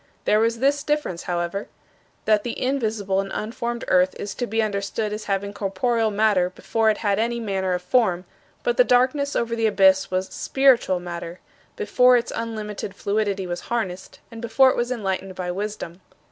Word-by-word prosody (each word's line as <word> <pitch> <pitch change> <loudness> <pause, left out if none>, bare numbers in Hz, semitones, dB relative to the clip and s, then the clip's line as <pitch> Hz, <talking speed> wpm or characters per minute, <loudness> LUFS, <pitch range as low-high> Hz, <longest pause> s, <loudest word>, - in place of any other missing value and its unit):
There 210 - +4
was 230 +1 +1
this 280 +4 +2
difference, 295 - -1
however: 175 +3 -2 0.6
that 215 -1 +3
the 240 - -4
invisible 220 -7 0
and 195 0 -2
unformed 235 +2 -4
earth 185 0 +3
is 200 0 -4
to 245 +3 -3
be 225 +1 0
understood 210 +1 -2
as 215 0 -5
having 200 0 -2
corporeal 215 +3 0
matter 205 -4 +2
before 220 +4 0
it 215 - +1
had 200 0 +2
any 235 +1 0
manner 190 -4 -1
of 180 - -5
form; 185 -3 +2 0.4
but 485 -1 0
the - - +7
darkness 275 - +2
over 230 0 0
the 225 -1 +2
abyss 190 -2 +4
was 185 0 -1
spiritual 255 -9 +2
matter, 175 0 -7 0.4
before 250 - +4
its 235 - -3
unlimited 210 -3 -5
fluidity 200 -1 -1
was 175 -1 -4
harnessed, 185 -5 -3
and 230 -1 -9
before 260 +3 +4
it - - -3
was 240 +1 -1
enlightened 195 -5 -3
by 180 -1 -3
Wisdom." 195 -2 -5
210 Hz, 175 wpm, -23 LUFS, 190-235 Hz, 0.6 s, the